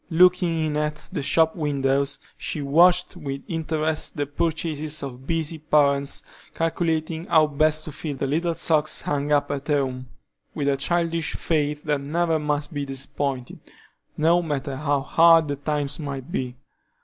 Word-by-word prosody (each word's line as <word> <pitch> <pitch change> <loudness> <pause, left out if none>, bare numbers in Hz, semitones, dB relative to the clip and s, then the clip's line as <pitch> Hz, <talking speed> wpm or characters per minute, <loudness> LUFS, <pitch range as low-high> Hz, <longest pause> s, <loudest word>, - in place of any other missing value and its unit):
Looking 175 -1 +4
in 150 -1 -1
at 150 0 -3
the - - -2
shop 160 +3 +2
windows, 140 -2 0 0.2
she - - -4
watched, 175 +7 +4
with 140 -5 -5
interest, 160 -2 -2
the 145 - 0
purchases 155 0 -1
of 130 -1 -8
busy 165 -1 -1
parents, 140 -2 +2 0.3
calculating 165 0 -1
how 160 -2 +5
best 155 +1 +1
to 155 - -6
fill 145 0 -5
the 135 - -1
little 165 +5 0
socks 155 -2 +1
hung 145 0 -1
up 145 -1 +2
at 140 0 -4
home, 130 -4 -1 0.5
with 140 -2 0
a 140 - +1
childish 165 +2 0
faith 150 -2 -1
that 150 -2 0
never 160 +3 0
must 150 +1 -2
be 145 -1 -2
disappointed, 135 -1 -3 0.6
no 170 +3 +4
matter 145 -4 -3
how 145 0 0
hard 165 +2 +5
the 145 - -2
times 145 0 -2
might 140 -4 -6
be. 125 -1 -3
150 Hz, 155 wpm, -24 LUFS, 140-160 Hz, 0.6 s, how